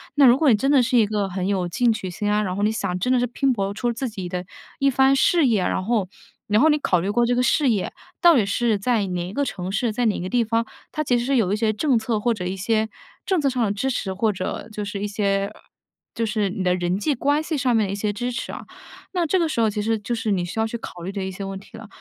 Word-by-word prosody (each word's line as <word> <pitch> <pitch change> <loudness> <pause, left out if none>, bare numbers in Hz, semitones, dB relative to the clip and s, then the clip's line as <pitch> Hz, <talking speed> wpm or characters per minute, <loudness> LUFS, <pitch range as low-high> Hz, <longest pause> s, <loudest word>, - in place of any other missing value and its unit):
那 290 -1 +6
如 245 -1 +7
果 305 -4 +4
你 225 - +6
真 270 +7 +1
的 280 -3 +6
是 250 +1 +2
一 225 - +5
个 205 -1 -1
很 185 0 -3
有 190 -3 0
进 230 +7 +2
取 190 -4 -5
心 205 +4 -2
啊， 210 0 +2
然 185 -3 -2
后 205 - -1
你 210 - +3
想 200 -5 -2
真 250 +7 +1
的 255 - +3
是 245 - +1
拼 265 +2 +1
搏 200 -3 -2
出 240 +1 -1
自 250 +2 -3
己 195 -5 -6
的 180 0 -4 0.3
一 275 - +3
番 265 +1 +4
事 325 +3 +3
业， 220 -5 +2
然 185 - -1
后， 215 -2 0 0.4
然 210 +2 +3
后 315 - +6
你 300 - +4
考 180 -11 +1
虑 190 - -2
过 240 +3 +2
这 245 +1 +1
个 250 - +2
事 270 +3 +3
业 210 -5 0 0.3
到 345 -2 +7
底 215 - +3
是 220 +1 +1
在 220 -1 +1
哪 180 -1 -3
一 - - -9
个 285 - 0
城 185 -7 -4
市， 225 +3 0
在 245 +3 0
哪 215 -5 +1
个 185 - -4
地 240 +1 +2
方， 230 +1 0 0.3
他 305 - -1
其 245 -4 +2
实 240 - -2
是 275 +1 +1
有 215 -7 +2
一 - - +1
些 215 -1 +1
政 250 +1 +2
策， 220 -1 -1
或 240 +2 +2
者 195 -5 -5
一 185 +1 -2
些 220 +2 +1 0.4
政 370 -4 +1
策 275 - +2
上 255 -1 -2
的 205 - +1
支 235 +7 -1
持， 195 -6 -2
或 215 +3 +1
者 190 +3 -5
就 210 -1 -4
是 200 0 -5
一 205 - -1
些 200 -1 0 0.6
就 230 - 0
是 215 -3 0
你 195 0 -3
的 180 -1 +2
人 175 +1 -1
际 300 +6 +1
关 285 +4 +1
系 315 0 -2
上 255 -3 +1
面 220 -2 +3
的 - - -4
一 - - -2
些 205 +1 -1
支 245 +4 -3
持 255 +2 -4
啊。 - - -8 0.5
那 355 -2 +1
这 375 - +2
个 335 - +2
时 235 - 0
候 220 - +3
其 210 - -4
实 225 +1 0
就 235 +4 -3
是 225 -2 -2
你 185 -3 +1
需 175 - -7
要 220 - +2
去 225 - -6
考 175 - -9
虑 185 - -4
的 200 -1 -4
一 190 - -3
些 190 +2 -7
问 195 0 -5
题 200 +3 -14
了。 225 -1 -10
220 Hz, 325 characters per minute, -23 LUFS, 195-245 Hz, 0.6 s, 如